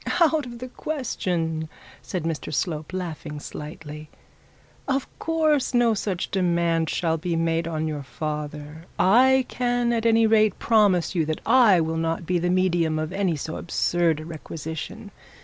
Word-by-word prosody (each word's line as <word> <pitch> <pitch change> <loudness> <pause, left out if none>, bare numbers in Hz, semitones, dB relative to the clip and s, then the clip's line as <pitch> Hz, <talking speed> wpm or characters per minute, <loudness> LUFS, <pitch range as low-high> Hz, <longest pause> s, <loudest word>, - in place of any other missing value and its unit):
'Out 315 -5 +3
of 240 -1 -8
the 255 +2 -7
question,' 175 - -3 0.3
said 180 -4 -4
Mr 165 -2 -3
Slope, 155 0 -2
laughing 165 -5 -5
slightly; 150 +1 -8 0.8
'of 270 -1 0
course 310 -5 +1
no 240 -2 +4
such 195 -3 -3
demand 170 -3 +1
shall 165 -2 0
be 170 +1 -2
made 165 0 0
on 160 -1 -2
your 150 -2 -3
father. 150 +1 -6
I 255 +6 +5
can 245 -1 0
at 230 0 +1
any 225 0 +4
rate 215 -2 +3
promise 205 -7 +3
you 170 -3 +1
that 155 0 -3
I 220 -9 +6
will 160 0 -1
not 165 +1 -1
be 180 +1 +1
the 175 +1 0
medium 175 -3 +2
of 155 +3 -3
any 190 -4 0
so 155 +2 -5
absurd 170 -2 +1
a 155 - -8
requisition. 160 -1 -7
170 Hz, 155 wpm, -24 LUFS, 160-225 Hz, 0.8 s, I